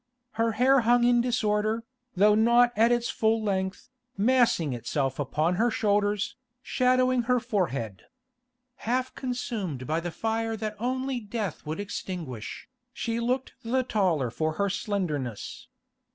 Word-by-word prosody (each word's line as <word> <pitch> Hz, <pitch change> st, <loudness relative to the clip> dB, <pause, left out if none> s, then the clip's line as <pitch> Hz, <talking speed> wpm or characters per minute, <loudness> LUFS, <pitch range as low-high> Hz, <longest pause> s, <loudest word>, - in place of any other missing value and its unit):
Her 230 Hz, 0 st, 0 dB
hair 265 Hz, +4 st, +4 dB
hung 240 Hz, +1 st, +4 dB
in 240 Hz, 0 st, +4 dB
disorder, 220 Hz, -2 st, 0 dB, 0.3 s
though 205 Hz, +3 st, +5 dB
not 235 Hz, +3 st, +4 dB
at 225 Hz, +3 st, +4 dB
its 240 Hz, 0 st, +1 dB
full 220 Hz, 0 st, +2 dB
length, 190 Hz, -2 st, -2 dB, 0.3 s
massing 220 Hz, -, +3 dB
itself 135 Hz, +3 st, -2 dB
upon 155 Hz, +5 st, 0 dB
her 235 Hz, +4 st, +3 dB
shoulders, 205 Hz, -1 st, 0 dB, 0.3 s
shadowing 255 Hz, -1 st, +2 dB
her 250 Hz, 0 st, +4 dB
forehead. 140 Hz, -, -2 dB, 0.7 s
Half 255 Hz, +3 st, -1 dB
consumed 225 Hz, -, -4 dB
by 155 Hz, +3 st, 0 dB
the 175 Hz, +1 st, -4 dB
fire 225 Hz, +4 st, -2 dB
that 215 Hz, 0 st, -4 dB
only 260 Hz, +2 st, -1 dB
death 210 Hz, -7 st, -5 dB
would 155 Hz, +4 st, -3 dB
extinguish, 175 Hz, -, -6 dB, 0.2 s
she 230 Hz, -2 st, -2 dB
looked 250 Hz, +3 st, -1 dB
the 255 Hz, +3 st, +1 dB
taller 180 Hz, -, +1 dB
for 155 Hz, +4 st, -1 dB
her 200 Hz, +4 st, 0 dB
slenderness. 155 Hz, -, -3 dB
215 Hz, 135 wpm, -27 LUFS, 180-240 Hz, 0.7 s, though